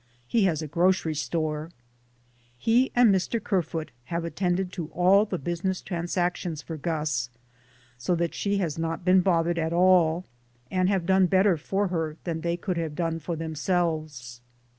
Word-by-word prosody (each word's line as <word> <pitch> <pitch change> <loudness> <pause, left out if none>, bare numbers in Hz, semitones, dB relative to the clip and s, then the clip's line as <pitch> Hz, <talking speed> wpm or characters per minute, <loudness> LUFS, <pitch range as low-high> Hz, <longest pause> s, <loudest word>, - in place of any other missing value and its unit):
He 220 - +2
has 160 -4 0
a - - -4
grocery 170 +1 +2
store. 155 0 -2 0.9
He 235 - +2
and 240 -4 +6
Mr. 190 +5 0
Kerfoot 175 -6 -2
have 170 +3 -3
attended 180 +2 -1
to 170 -4 -5
all 190 +4 +5
business 185 0 -2
transactions 175 -2 -2
for 165 - -6
Gus, 150 -6 -2 0.7
so 150 +9 0
that 170 0 -1
she 200 0 -1
has 165 -5 -2
not 165 +2 -3
been 185 0 +5
bothered 170 -2 +1
at 160 0 -1
all, 175 -1 +4 0.5
and 185 0 +2
have 190 -4 0
done 190 0 +4
better 190 +1 +4
for 195 +6 -1
her 160 -3 -2
than 165 -2 -3
they 170 +1 -1
could 180 0 -3
have 160 -3 -3
done 165 -1 -1
for 165 +2 -4
themselves. 155 -6 -2
170 Hz, 160 wpm, -26 LUFS, 160-185 Hz, 0.9 s, and